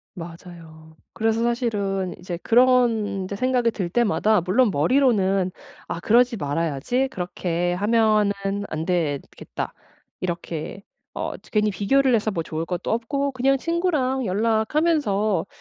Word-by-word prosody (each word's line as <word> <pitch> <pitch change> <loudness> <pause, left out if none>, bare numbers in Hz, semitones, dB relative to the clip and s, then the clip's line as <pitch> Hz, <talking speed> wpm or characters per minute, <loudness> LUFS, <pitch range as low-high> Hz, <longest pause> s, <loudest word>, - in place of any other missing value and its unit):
맞아요. 165 -2 -11 0.2
그래서 225 0 0
사실은 205 -6 -1
이제 175 -1 -5
그런 235 -5 +3
이제 190 +2 -5
생각이 250 +1 +1
들 190 -5 -3
때마다 215 -1 +2
물론 210 +8 +3
머리로는 195 - +2 0.4
'아 - - -4
그러지 240 +3 +3
말아야지. 165 - -1
그렇게 175 -2 -2
하면은 215 +1 +3 0.4
안 155 +1 -3
되겠다. 165 -6 -3 0.5
이렇게 170 +1 -5 0.3
어 - - -3
저 - - -20
괜히 210 -1 +2
비교를 260 +7 +2
해서 220 -1 +2
뭐 170 -6 -2
좋을 160 0 -4
것도 180 -2 -3
없고 275 +5 -1
그냥 270 +1 +2
친구랑 295 -5 0
연락하면서 220 - +1
210 Hz, 290 characters per minute, -23 LUFS, 175-245 Hz, 0.5 s, 그런